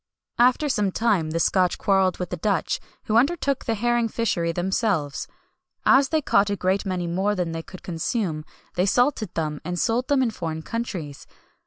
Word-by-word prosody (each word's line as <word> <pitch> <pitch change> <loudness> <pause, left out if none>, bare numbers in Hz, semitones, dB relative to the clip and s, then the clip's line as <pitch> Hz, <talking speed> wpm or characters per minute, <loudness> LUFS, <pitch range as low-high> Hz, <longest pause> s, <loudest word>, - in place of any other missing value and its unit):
After 255 +5 +4
some 210 -8 +1
time 195 -7 +1
the 165 +1 -1
Scotch 180 +1 +2
quarrelled 190 -2 +2
with 180 - -5
the - - -1
Dutch, 200 +3 0 0.2
who 220 - +1
undertook 280 +1 +1
the 230 - 0
herring 240 +1 +1
fishery 195 -7 -1
themselves. 175 -4 -1 0.6
As 270 +1 +5
they 315 -2 +1
caught 200 -4 +3
a 200 - 0
great 190 +1 0
many 180 -2 -2
more 190 +5 0
than 180 -3 -2
they 165 0 -4
could 185 +2 -12
consume, 165 -1 -2 0.3
they 180 +2 +1
salted 245 - +2
them, 155 -2 -2
and 175 +2 -3
sold 240 +5 0
them 280 -3 +3
in 235 - 0
foreign 160 -6 -5
countries. 180 -12 -5
195 Hz, 180 wpm, -24 LUFS, 170-235 Hz, 0.6 s, As